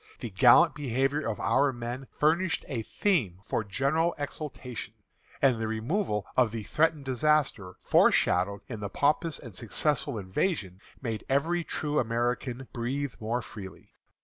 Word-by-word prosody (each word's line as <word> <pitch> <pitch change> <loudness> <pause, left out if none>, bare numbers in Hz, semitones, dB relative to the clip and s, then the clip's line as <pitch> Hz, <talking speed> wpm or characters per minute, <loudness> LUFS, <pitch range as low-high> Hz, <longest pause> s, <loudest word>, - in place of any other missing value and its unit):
The 120 - -5
gallant 120 +5 +6
behavior 135 +1 0
of 110 - -3
our 140 +1 +3
men 120 +2 -6
furnished 165 +4 +2
a 120 -4 -2
theme 110 - 0
for 110 - -1
general 140 - +1
exultation, 145 -4 -6 0.5
and 130 -4 +5
the 110 0 -2
removal 110 - -1
of 125 -4 +3
the 115 -1 -4
threatened 155 +3 +1
disaster 130 -8 +1
foreshadowed 100 +3 +3
in 115 -4 -6
the 100 -1 -4
pompous 150 - +1
and 115 -8 -11
successful 120 +5 -1
invasion, 95 - -2 0.2
made 115 -4 -3
every 165 +6 +1
true 150 -2 -1
American 120 +2 -1
breathe 130 +3 -2
more 115 +2 -2
freely. 95 -3 -10
125 Hz, 140 wpm, -28 LUFS, 110-150 Hz, 0.5 s, gallant